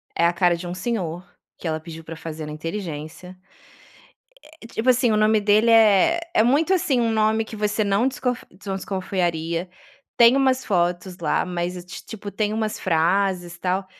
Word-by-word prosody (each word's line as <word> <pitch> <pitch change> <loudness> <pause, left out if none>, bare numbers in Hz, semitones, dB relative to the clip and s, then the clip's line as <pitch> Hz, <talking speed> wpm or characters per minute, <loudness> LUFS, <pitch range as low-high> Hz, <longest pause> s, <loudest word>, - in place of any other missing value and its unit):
É 170 - +2
a 170 - +3
cara 175 0 +3
de 175 +1 -7
um 175 - -4
senhor 185 -4 -3 0.3
que - - -6
ela 160 0 -1
pediu 165 0 -10
para 165 +1 -8
fazer 160 -1 -7
na - - -6
inteligência, 165 +1 -6 1.3
eh, - - -9
tipo 230 +2 -3
assim, 250 -1 +4
o - - +2
nome 215 0 +3
dele 210 +2 +3
é 225 - +5
é - - +5
muito 295 +9 +2
assim, 335 -9 +2
um 230 -1 +1
nome 220 0 +2
que 220 - -9
você 210 +1 0
não 200 +4 +2
descon 260 -2 -1 0.2
desconfiaria. 180 -3 -3 0.5
Tem 235 +2 +7
umas 260 -1 +2
fotos 180 -1 -1
lá, 160 -3 0
mas, 180 0 -4 0.2
tipo, 210 -2 -7
tem 210 +1 -1
umas 220 -1 -2
frases 175 +1 0
tal. 185 +2 -1
195 Hz, 170 wpm, -23 LUFS, 175-220 Hz, 1.3 s, Tem